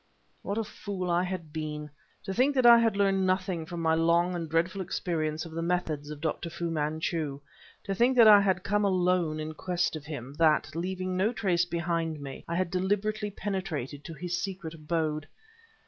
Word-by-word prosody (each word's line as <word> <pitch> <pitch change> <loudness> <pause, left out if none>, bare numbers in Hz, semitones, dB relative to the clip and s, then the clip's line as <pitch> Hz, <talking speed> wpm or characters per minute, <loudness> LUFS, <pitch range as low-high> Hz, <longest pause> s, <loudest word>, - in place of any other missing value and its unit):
What 200 - -3
a 225 - +1
fool 195 -4 -4
I 170 +1 +3
had 180 -4 -4
been. 150 -1 -5 0.3
To 195 - -4
think 265 +6 +2
that 255 -2 +3
I 235 -1 +9
had 225 -3 +2
learned 195 -1 +2
nothing 185 -3 -1
from 170 -1 -5
my 160 0 +3
long 170 +2 +3
and 165 -2 -4
dreadful 175 +4 0
experience 160 -4 -2
of 165 - -9
the 165 +1 -3
methods 165 -4 -1
of 150 -1 -7
Dr. 165 +1 -2
Fu 170 0 -3
Manchu; 155 -1 -2 0.4
to 195 - -2
think 245 +6 +3
that 230 -2 +9
I 205 -1 +9
had 190 -2 +1
come 205 +1 +1
alone 180 -4 +2
in 155 0 -4
quest 175 +1 -1
of 150 -2 -7
him; 140 -4 -7
that, 155 -1 +3
leaving 185 +2 -2
no 195 +5 +2
trace 180 -7 +1
behind 170 -2 -2
me, 140 -1 -8
I 170 - -2
had 185 -1 0
deliberately 205 +3 0
penetrated 185 -9 -4
to 165 - -7
his 180 +3 -3
secret 190 -4 -5
abode! 155 -1 -2
175 Hz, 195 wpm, -29 LUFS, 160-190 Hz, 0.4 s, I